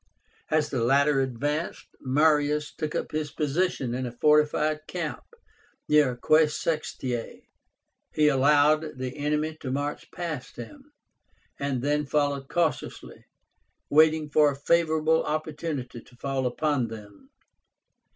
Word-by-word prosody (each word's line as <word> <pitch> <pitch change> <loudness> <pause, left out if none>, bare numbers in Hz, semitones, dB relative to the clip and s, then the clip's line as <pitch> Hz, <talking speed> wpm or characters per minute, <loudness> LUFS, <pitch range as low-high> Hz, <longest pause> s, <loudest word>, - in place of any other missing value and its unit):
As 155 -1 +1
the 125 -4 -1
latter 140 +3 +3
advanced, 145 +5 -2
Marius 150 +2 +2
took 155 -1 -4
up - - -3
his 155 -1 -2
position 150 -4 -1
in 130 0 -3
a - - -6
fortified 150 +3 +2
camp 170 -4 -4 0.7
near 150 -4 +4
AQUAE 155 +6 +3
SEXTIAE 150 -6 -2
(Aix). - - -16 0.6
He 150 -1 +3
allowed 150 +2 +3
the 130 0 -5
enemy 150 +2 -1
to 135 - -5
march 145 +2 -3
past 170 -4 -6
him, 295 0 -11 0.7
and 135 -3 -2
then 145 0 0
followed 140 -2 0
cautiously, 160 -6 -2 0.7
waiting 155 0 +4
for 150 0 +5
a - - -6
favorable 160 +1 +2
opportunity 150 -5 -4
to 125 - -20
fall 135 0 -2
upon 140 -1 0
them. 105 -3 -12
150 Hz, 125 wpm, -26 LUFS, 135-155 Hz, 0.7 s, for